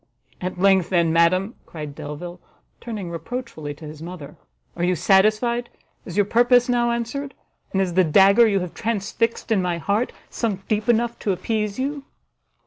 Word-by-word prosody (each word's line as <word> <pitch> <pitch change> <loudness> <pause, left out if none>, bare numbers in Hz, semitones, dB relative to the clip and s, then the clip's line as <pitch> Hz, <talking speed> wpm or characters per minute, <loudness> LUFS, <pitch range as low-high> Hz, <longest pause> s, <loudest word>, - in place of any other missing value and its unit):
"At 180 0 -4
length, 190 -1 +3
then, 170 -3 +2
madam," 185 +6 +3
cried 150 -3 -7
Delvile, 170 +5 -7 0.4
turning 210 -7 -6
reproachfully 165 - -6
to 155 - -11
his 150 0 -9
mother, 165 -4 -8 0.4
"are 170 - -3
you 180 +1 +2
satisfied? 215 +7 +2 0.4
is 180 +1 -7
your 205 - +4
purpose 245 +3 +4
now 240 -1 +2
answered? 240 +4 -3 0.4
and 190 - 0
is 185 -2 0
the 185 +1 +4
dagger 195 +7 +6
you 200 -3 +1
have 180 -2 -5
transfixed 230 +1 -2
in 205 -4 +3
my 175 -2 -1
heart 205 +8 0 0.2
sunk 200 -5 -3
deep 215 0 -1
enough 235 0 +2
to 200 - 0
appease 210 +1 -2
you?" 280 +2 -3
195 Hz, 165 wpm, -23 LUFS, 175-235 Hz, 0.4 s, dagger